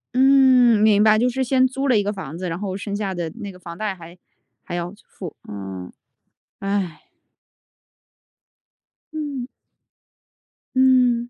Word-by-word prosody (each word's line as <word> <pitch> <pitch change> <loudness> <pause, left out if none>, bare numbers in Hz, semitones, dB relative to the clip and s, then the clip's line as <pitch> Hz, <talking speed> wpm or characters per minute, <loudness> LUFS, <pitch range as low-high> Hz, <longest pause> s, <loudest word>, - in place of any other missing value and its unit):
嗯， 260 -3 +6
明 210 -1 +5
白， 215 0 +5
就 240 +3 +2
是 265 +2 -1
先 260 0 +3
租 270 +2 -3
了 250 -4 +4
一 205 - +2
个 205 +1 -2
房 170 -6 -7
子， 185 +1 -4
然 165 -1 -3
后 195 -2 -3
剩 200 0 -4
下 200 -2 -2
的 170 -2 -3
那 205 -4 -6
个 180 - -14
房 170 -1 -9
贷 210 -1 -2
还 170 -1 -12 0.5
还 - - -6
要 175 +1 -4
付。 175 -6 -9
嗯， 95 -2 -7 0.7
唉。 195 -4 -2 2.1
嗯。 290 -5 -4 1.3
嗯。 250 -2 +4
210 Hz, 155 characters per minute, -22 LUFS, 180-250 Hz, 2.1 s, 嗯